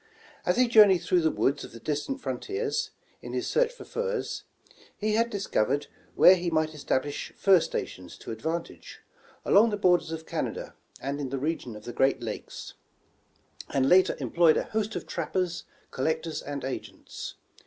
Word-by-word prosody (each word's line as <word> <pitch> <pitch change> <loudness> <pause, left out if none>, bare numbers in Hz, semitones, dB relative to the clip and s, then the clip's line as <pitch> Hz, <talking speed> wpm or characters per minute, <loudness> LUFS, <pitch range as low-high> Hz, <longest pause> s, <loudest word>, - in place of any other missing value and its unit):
As - - +3
he 250 0 +5
journej^ed 205 -6 +6
through 180 0 +3
the 160 - +3
woods 140 -1 0
of - - -10
the 115 - -9
distant 150 - -2
frontiers, 435 +3 -2 0.3
in - - -8
his - - -1
search - - +2
for - - -11
furs, 480 0 -3 0.5
he 215 0 0
had 230 +2 +2
discovered 145 - 0 0.3
where 185 - +9
he 175 -1 -1
might 155 -1 0
establish 145 -1 -2
fur 195 -2 +6
stations - - -5
to - - -8
advantage, 160 +9 -5 0.4
along 220 +3 +6
the 205 - -2
borders 180 -4 +3
of 160 0 -5
Canada - - -4 0.3
and 140 +1 -3
in 140 -2 -3
the 135 - -2
region 135 -5 -3
of 105 - -10
the 120 - -6
Great 135 +3 +2
Lakes; 115 -3 -6 1.0
and 135 -1 +1
later 185 +5 +5
employed 170 -2 +4
a - - +1
host 215 0 -2
of - - -4
trappers, 180 -2 -2 0.3
collectors 160 +4 -1
and 145 -1 -5
agents. 135 - -7
170 Hz, 165 wpm, -28 LUFS, 140-210 Hz, 1.0 s, where